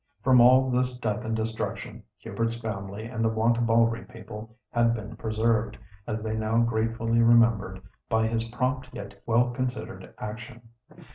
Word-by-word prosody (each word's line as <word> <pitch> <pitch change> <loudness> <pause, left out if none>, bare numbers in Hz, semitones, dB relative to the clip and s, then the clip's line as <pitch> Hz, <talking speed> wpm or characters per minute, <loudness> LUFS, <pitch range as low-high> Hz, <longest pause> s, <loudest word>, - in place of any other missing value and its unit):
From 130 -2 +6
all 130 +2 +6
this 125 0 0
death 110 -4 -2
and 110 0 -1
destruction 110 0 -4 0.2
Hubert's 115 0 -3
family 100 -1 -5
and 115 -1 -3
the 110 - +3
Wantabalree 115 0 +2
people 110 0 -10
had 115 0 +3
been 110 0 -7
preserved, 110 -1 0 0.3
as 110 -1 -3
they 110 0 -2
now 110 +1 0
gratefully 115 0 +1
remembered, 115 -5 +4 0.3
by 110 0 +2
his 115 0 0
prompt 125 +2 -2
yet 100 0 -9
well 120 +2 +3
considered 125 0 -5
action. 120 +2 -8
115 Hz, 145 wpm, -27 LUFS, 110-120 Hz, 0.3 s, From